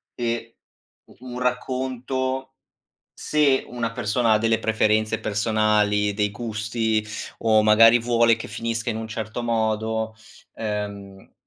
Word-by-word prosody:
e 115 Hz, -1 st, -3 dB, 0.6 s
u -, -, -18 dB
un 125 Hz, -1 st, -7 dB
racconto, 130 Hz, +1 st, -2 dB, 0.6 s
se 145 Hz, -3 st, +1 dB
una 120 Hz, -2 st, -3 dB
persona 115 Hz, 0 st, +1 dB
ha -, -, +4 dB
delle 115 Hz, +1 st, +1 dB
preferenze 110 Hz, 0 st, +1 dB
personali, 105 Hz, -1 st, +1 dB
dei 105 Hz, 0 st, 0 dB
gusti, 110 Hz, 0 st, -2 dB, 0.3 s
o, 110 Hz, -1 st, +4 dB
magari, 115 Hz, +2 st, +7 dB
vuole 115 Hz, -1 st, +3 dB
che 115 Hz, -, -7 dB
finisca 115 Hz, +2 st, -3 dB
in 110 Hz, -, -5 dB
un 110 Hz, 0 st, -5 dB
certo 110 Hz, +2 st, -5 dB
modo, 110 Hz, -1 st, -1 dB, 0.4 s
ehm, 100 Hz, -2 st, -6 dB
110 Hz, 120 wpm, -23 LUFS, 110-120 Hz, 0.6 s, magari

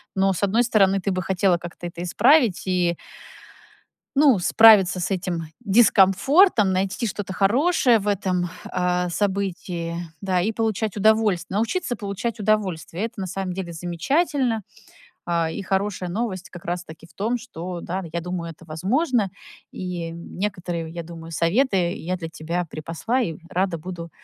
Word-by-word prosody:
Но, 195 Hz, 0 st, +3 dB
с 185 Hz, -, -4 dB
одной 220 Hz, +5 st, +3 dB
стороны, 195 Hz, -4 st, +3 dB
ты 195 Hz, +1 st, -1 dB
бы 185 Hz, 0 st, -1 dB
хотела 185 Hz, 0 st, +2 dB
как-то 175 Hz, 0 st, -8 dB
это 170 Hz, 0 st, -7 dB
исправить 235 Hz, -, +4 dB
и 175 Hz, -2 st, +1 dB, 1.2 s
ну, 275 Hz, -9 st, +6 dB
справиться 195 Hz, -2 st, +6 dB
с 185 Hz, -, -2 dB
этим 180 Hz, -3 st, -2 dB, 0.2 s
дискомфортом, 215 Hz, -, +4 dB
найти 190 Hz, +5 st, -1 dB
что-то 195 Hz, -2 st, -4 dB
хорошее 240 Hz, -, +3 dB
в 205 Hz, -, -6 dB
этом, 185 Hz, -3 st, 0 dB, 0.2 s
а, 180 Hz, 0 st, 0 dB
событии, 180 Hz, -3 st, -2 dB, 0.2 s
да, 185 Hz, -2 st, +1 dB
и 215 Hz, +5 st, 0 dB
получать 220 Hz, -2 st, -1 dB
удовольствие. 205 Hz, -3 st, +2 dB
Научиться 245 Hz, -, -1 dB
получать 205 Hz, +2 st, -4 dB
удовольствие- 195 Hz, -4 st, -1 dB
это 230 Hz, -2 st, -8 dB
на 190 Hz, -, -3 dB
самом 190 Hz, 0 st, -3 dB
деле 175 Hz, -2 st, -5 dB
замечательно, 230 Hz, -, 0 dB, 0.6 s
а, 170 Hz, -2 st, 0 dB
и 200 Hz, -, -5 dB
хорошая 190 Hz, -1 st, -1 dB
новость, 195 Hz, -1 st, -3 dB
как 175 Hz, -, -11 dB
раз-таки, 170 Hz, -2 st, -6 dB
в -, -, -24 dB
том, 225 Hz, +5 st, -1 dB
что, 180 Hz, -7 st, -7 dB
да, 180 Hz, +3 st, -4 dB
н 170 Hz, -4 st, -6 dB
я 170 Hz, -, -1 dB
думаю, 170 Hz, -1 st, -4 dB
это 165 Hz, -, -17 dB
возможно, 210 Hz, -, 0 dB, 0.4 s
и 175 Hz, -3 st, -5 dB
некоторые, 175 Hz, -1 st, -4 dB
я 170 Hz, 0 st, -6 dB
думаю, 165 Hz, 0 st, -10 dB
советы 180 Hz, -, +2 dB
я 180 Hz, +3 st, -3 dB
для 165 Hz, -2 st, -6 dB
тебя 165 Hz, +3 st, -3 dB
припасла, 165 Hz, +11 st, -3 dB
и 165 Hz, -9 st, -1 dB, 0.2 s
рада 185 Hz, -1 st, 0 dB
буду 170 Hz, 0 st, -7 dB
190 Hz, 155 wpm, -23 LUFS, 175-215 Hz, 1.2 s, ну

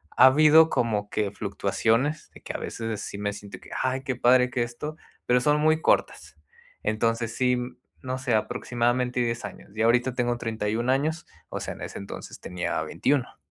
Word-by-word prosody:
Ha 130 Hz, -, +8 dB
habido 155 Hz, +4 st, +7 dB
como 105 Hz, -6 st, 0 dB
que 105 Hz, -2 st, -1 dB
fluctuaciones 115 Hz, +8 st, 0 dB
de -, -, -14 dB
que -, -, -6 dB
a -, -, -3 dB
veces 115 Hz, -2 st, -4 dB
sí 100 Hz, -, -6 dB
me 105 Hz, 0 st, -2 dB
siento 105 Hz, 0 st, -10 dB
que: -, -, -16 dB
"Ay, 130 Hz, +1 st, -1 dB
qué 130 Hz, -1 st, -2 dB
padre 125 Hz, +1 st, +4 dB
que 125 Hz, -, -1 dB
esto", 135 Hz, +6 st, -6 dB, 0.3 s
pero 125 Hz, 0 st, +3 dB
son 150 Hz, +3 st, +3 dB
muy 155 Hz, +1 st, +3 dB
cortas. -, -, 0 dB, 0.5 s
Entonces 115 Hz, +1 st, 0 dB
sí, 125 Hz, -1 st, +2 dB, 0.4 s
no 130 Hz, 0 st, -3 dB
sé, 130 Hz, -3 st, -1 dB
aproximadamente 125 Hz, +3 st, 0 dB
10 115 Hz, -2 st, -1 dB
años 105 Hz, -, -10 dB
yo 110 Hz, +1 st, +1 dB
ahorita 120 Hz, +2 st, +3 dB
tengo 120 Hz, -1 st, 0 dB
31 115 Hz, +1 st, -2 dB
años. 155 Hz, +5 st, 0 dB, 0.2 s
O -, -, -4 dB
sea, -, -, -4 dB
en -, -, -13 dB
ese -, -, -6 dB
entonces 100 Hz, -, -8 dB
tenía 90 Hz, -3 st, -3 dB
21. 120 Hz, -, 0 dB
120 Hz, 180 wpm, -26 LUFS, 110-130 Hz, 0.5 s, Ha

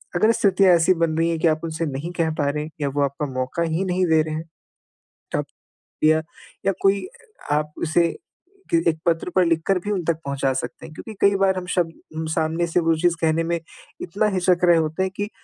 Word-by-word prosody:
अगर 215 Hz, +6 st, +4 dB
स्थितियाँ 195 Hz, -4 st, +4 dB
ऐसी 170 Hz, +2 st, +4 dB
बन 165 Hz, -2 st, 0 dB
रही 165 Hz, +1 st, +2 dB
है 165 Hz, -, 0 dB
कि 165 Hz, -, +3 dB
आप 155 Hz, 0 st, +1 dB
उनसे 165 Hz, 0 st, -2 dB
नहीं 145 Hz, +4 st, -4 dB
कह 165 Hz, -2 st, +1 dB
पा 145 Hz, -1 st, +2 dB
रहे 150 Hz, +1 st, -2 dB
हैं 155 Hz, -, -7 dB
या 140 Hz, -, 0 dB
वो 145 Hz, +1 st, -1 dB
आपका 140 Hz, +2 st, -2 dB
मौक़ा 130 Hz, +6 st, -2 dB
ही 165 Hz, +3 st, -1 dB
नहीं 185 Hz, 0 st, +1 dB
दे 160 Hz, -1 st, +4 dB
रहे 155 Hz, 0 st, -3 dB
हैं, 160 Hz, -, -4 dB, 0.9 s
तब -, -, -1 dB, 0.6 s
या, 155 Hz, +1 st, +5 dB, 0.4 s
या 195 Hz, -, +4 dB
कोई 195 Hz, -1 st, +2 dB, 0.4 s
आपसे 155 Hz, +3 st, +1 dB, 0.6 s
के -, -, +6 dB
एक 160 Hz, -1 st, -2 dB
पत्र 170 Hz, 0 st, +1 dB
पर 185 Hz, -, +5 dB
लिख 165 Hz, -1 st, +2 dB
कर 195 Hz, -2 st, +3 dB
भी 205 Hz, +4 st, -4 dB
उन 190 Hz, -4 st, -1 dB
तक 165 Hz, -1 st, 0 dB
पहुँचा 140 Hz, -1 st, 0 dB
सकते 130 Hz, -, -5 dB
हैं 160 Hz, -, -11 dB
क्योंकि 220 Hz, -, -8 dB
कई 200 Hz, 0 st, +5 dB
बार 190 Hz, -1 st, +2 dB
हम 185 Hz, -, -4 dB
शब्द 170 Hz, -3 st, +1 dB, 0.4 s
सामने 160 Hz, +2 st, 0 dB
से 170 Hz, +1 st, +1 dB
वो 165 Hz, -1 st, +2 dB
चीज़ 175 Hz, +1 st, +2 dB
कहने 160 Hz, 0 st, +2 dB
में 170 Hz, 0 st, -1 dB, 0.4 s
इतना 205 Hz, +5 st, 0 dB
हिचक 180 Hz, -1 st, +2 dB
रहे 175 Hz, -1 st, +6 dB
होते 160 Hz, +3 st, 0 dB
हैं 190 Hz, -, -2 dB
कि 205 Hz, 0 st, -3 dB
165 Hz, 220 wpm, -22 LUFS, 155-180 Hz, 0.9 s, के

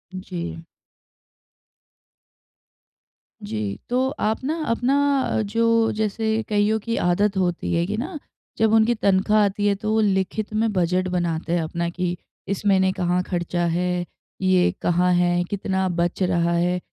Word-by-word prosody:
जी। 85 Hz, -, -6 dB, 2.8 s
जी, 105 Hz, -1 st, -4 dB
तो 255 Hz, +2 st, +1 dB
आप 220 Hz, +4 st, -1 dB
ना 300 Hz, +4 st, -1 dB
अपना, 270 Hz, +2 st, +1 dB
जो 230 Hz, +2 st, +2 dB
जैसे 220 Hz, +1 st, 0 dB
कइयों 210 Hz, +1 st, +2 dB
की 230 Hz, +2 st, -3 dB
आदत 195 Hz, +3 st, +1 dB
होती 175 Hz, -2 st, -1 dB
है 170 Hz, 0 st, +1 dB
कि 210 Hz, +2 st, -2 dB
ना, 305 Hz, +7 st, -4 dB, 0.4 s
जब 220 Hz, 0 st, +3 dB
उनकी 225 Hz, +2 st, +4 dB
तनख्वाह 210 Hz, +1 st, +3 dB
आती 205 Hz, +1 st, 0 dB
है, 200 Hz, -, +2 dB
तो 215 Hz, +2 st, -3 dB
वो 220 Hz, 0 st, +3 dB
लिखित 200 Hz, +1 st, -1 dB
में 220 Hz, +1 st, +1 dB
बजट 185 Hz, 0 st, +1 dB
बनाते 175 Hz, -2 st, -1 dB
हैं 175 Hz, -, +1 dB
अपना 170 Hz, +2 st, -2 dB
कि 175 Hz, 0 st, -3 dB, 0.3 s
इस 200 Hz, +1 st, -3 dB
महीने 190 Hz, -2 st, +4 dB
कहाँ 180 Hz, -1 st, 0 dB
खर्चा 175 Hz, -1 st, -2 dB
है? 175 Hz, +1 st, 0 dB, 0.4 s
ये 185 Hz, -1 st, +3 dB
कहाँ 180 Hz, +1 st, +2 dB
है? 175 Hz, 0 st, +2 dB
कितना 190 Hz, -1 st, -1 dB
बच 175 Hz, +1 st, -1 dB
रहा 170 Hz, -1 st, +1 dB
है? 175 Hz, +1 st, +1 dB
190 Hz, 145 wpm, -23 LUFS, 175-220 Hz, 2.8 s, उनकी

